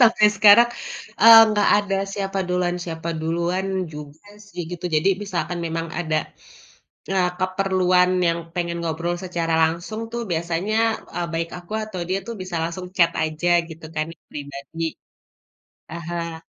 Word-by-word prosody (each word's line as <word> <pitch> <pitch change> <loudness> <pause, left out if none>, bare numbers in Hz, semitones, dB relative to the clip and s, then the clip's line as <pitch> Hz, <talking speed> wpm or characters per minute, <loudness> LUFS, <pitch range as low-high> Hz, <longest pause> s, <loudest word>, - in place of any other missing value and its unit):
sampai 225 -3 +6
sekarang, 210 +3 +8 0.5
eee, 225 0 +11
nggak 210 -1 +2
ada 200 -1 -1 0.2
siapa 195 -1 -3
duluan 180 -1 0
siapa 165 -1 -5
duluan 170 +4 -1 0.3
juga 150 +3 -10 0.2
sih, 180 -3 -7
gitu 175 0 -7
jadi 155 +5 +3
misalkan 180 -3 -3
memang 165 0 -3
ada, 160 -3 0 1.0
eee, 185 -2 +2
keperluan 185 -1 +2 0.2
yang 170 0 +1 0.2
pengen 170 -1 -2
ngobrol 170 +1 -2
secara 170 -3 -2
langsung 170 +7 -1
tuh 235 0 -3
biasanya, 170 +5 -1 0.4
eee, 175 -1 -1
baik 165 0 -2
aku 175 +1 -14
atau 215 -4 -6
dia 190 - +1
tuh 235 - -4
bisa 185 -2 -5
langsung 170 +2 -4
chat 170 -2 +4
aja 155 +2 -1 0.2
gitu 160 0 -10
kan 155 0 -1 0.2
pribadi, 140 +2 -7 1.1
heeh. 170 0 -5
175 Hz, 140 wpm, -22 LUFS, 165-190 Hz, 1.1 s, eee